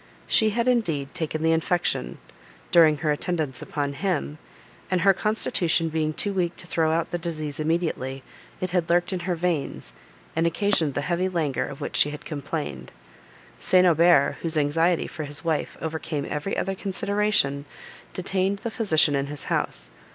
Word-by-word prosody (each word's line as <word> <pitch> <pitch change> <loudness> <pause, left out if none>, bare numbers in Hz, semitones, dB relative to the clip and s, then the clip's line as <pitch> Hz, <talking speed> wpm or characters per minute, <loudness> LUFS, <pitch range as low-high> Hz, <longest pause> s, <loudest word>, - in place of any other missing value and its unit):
She 220 - +3
had, 235 +3 0
indeed, 165 - +1
taken 160 -1 -3
the 160 - +4
infection, 165 - 0 0.5
during 160 -3 +6
her 150 +2 0
attendance 150 -4 -2
upon 145 -2 -3
him, 155 -3 -2 0.5
and, 185 -1 +1
her 195 +2 +6
constitution 175 -5 +1
being 155 -1 0
too 200 +6 -2
weak 180 -2 0
to - - -7
throw 160 -2 +1
out 165 +1 0
the 175 - -2
disease 155 -4 -3
immediately, 155 -5 -1 0.4
it 185 -1 -3
had 175 -2 0
lurked 175 +2 +2
in 185 - -1
her 175 - +2
veins, 170 -4 -2 0.4
and 165 +1 +2
occasioned 170 -5 +1
the - - 0
heavy 180 +4 0
languor 160 -7 -1
of 140 - -9
which - - -4
she 150 - +5
had 150 0 -8
complained. 145 - -5 0.7
St. 185 0 +4
Aubert, 170 -4 +5
whose 165 -1 -1
anxiety 165 +4 +2
for 155 -2 -6
his 145 +3 -6
wife 160 -2 -1
overcame 155 -2 -3
every 150 +6 -3
other 195 - -1
consideration, 195 -7 0 0.5
detained 190 +2 0
the 230 - -2
physician 160 -10 +3
in 140 0 0
his 145 0 -5
house. - - -2
165 Hz, 165 wpm, -25 LUFS, 150-180 Hz, 0.7 s, during